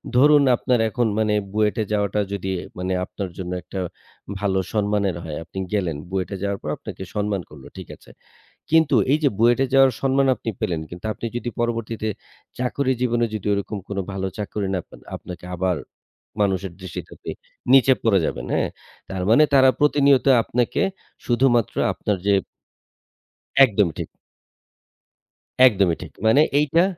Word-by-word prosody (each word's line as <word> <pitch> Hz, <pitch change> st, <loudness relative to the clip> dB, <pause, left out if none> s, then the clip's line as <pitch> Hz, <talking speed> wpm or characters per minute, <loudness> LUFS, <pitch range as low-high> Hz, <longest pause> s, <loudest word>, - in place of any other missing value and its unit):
ধরুন 145 Hz, +3 st, +6 dB
আপনার 125 Hz, 0 st, +1 dB
এখন 120 Hz, +1 st, 0 dB
মানে 110 Hz, -1 st, +2 dB, 0.2 s
বুয়েটে 110 Hz, +1 st, +1 dB
যাওয়াটা 105 Hz, 0 st, +1 dB
যদি 95 Hz, -1 st, -3 dB, 0.3 s
মানে 90 Hz, +1 st, -2 dB
আপনার 100 Hz, -1 st, -6 dB
জন্য 90 Hz, -1 st, -5 dB
একটা 90 Hz, +4 st, -7 dB, 0.6 s
ভালো 95 Hz, -2 st, +1 dB
সম্মানের 105 Hz, -3 st, +1 dB
হয়। 80 Hz, -3 st, -5 dB
আপনি 85 Hz, +4 st, -8 dB
গেলেন 90 Hz, -7 st, 0 dB
বুয়েটে 95 Hz, +1 st, -2 dB
যাওয়ার 100 Hz, -1 st, -2 dB
পর 75 Hz, -, -5 dB
আপনাকে -, -, -8 dB
সম্মান 105 Hz, -2 st, -1 dB
করলো। 70 Hz, -3 st, -13 dB
ঠিক -, -, -8 dB
আছে। -, -, -20 dB, 0.6 s
কিন্তু 160 Hz, -3 st, +4 dB, 0.2 s
এইযে 150 Hz, 0 st, +3 dB
বুয়েটে 120 Hz, +4 st, +4 dB
যাওয়ার 135 Hz, -1 st, +6 dB
সম্মান 135 Hz, 0 st, +2 dB
আপনি 115 Hz, 0 st, -4 dB
পেলেন 85 Hz, -3 st, -1 dB
কিন্তু 90 Hz, +2 st, -10 dB
আপনি 110 Hz, -, -6 dB
যদি 120 Hz, -, -3 dB
পরবর্তীতে 115 Hz, -2 st, -2 dB, 0.5 s
চাকরি 130 Hz, +2 st, 0 dB
জীবনে 120 Hz, -1 st, +1 dB
যদি 105 Hz, -2 st, -5 dB
ওরকম 100 Hz, +1 st, -3 dB
কোন 100 Hz, -, -4 dB
ভালো 95 Hz, -1 st, -3 dB
চাকরি 105 Hz, -1 st, -3 dB
না 90 Hz, -, 0 dB
পান -, -, -15 dB, 0.2 s
আপনাকে 90 Hz, -1 st, -10 dB
আবার 90 Hz, 0 st, 0 dB, 0.6 s
মানুষের 95 Hz, -2 st, 0 dB
দৃষ্টিতে 95 Hz, -3 st, -7 dB
আপনি -, -, -6 dB, 0.4 s
নিচে 135 Hz, 0 st, +7 dB
পড়ে 105 Hz, -4 st, +4 dB
যাবেন, -, -, -3 dB
হ্যাঁ? -, -, +1 dB, 0.4 s
তার 95 Hz, -1 st, -3 dB
মানে 125 Hz, +7 st, +7 dB
তারা 130 Hz, -1 st, +7 dB
প্রতিনিয়ত 140 Hz, -2 st, +4 dB, 0.2 s
আপনাকে 120 Hz, +1 st, 0 dB, 0.4 s
শুধুমাত্র 120 Hz, -2 st, +2 dB, 0.2 s
আপনার 105 Hz, -, -2 dB
যে 100 Hz, -, +4 dB, 1.3 s
একদম 105 Hz, -5 st, +2 dB
ঠিক। -, -, -4 dB, 1.6 s
একদমই 95 Hz, -8 st, +4 dB
ঠিক। -, -, -9 dB
মানে 115 Hz, +7 st, +6 dB, 0.2 s
এইটা 150 Hz, +4 st, +3 dB
105 Hz, 150 wpm, -22 LUFS, 95-125 Hz, 1.6 s, নিচে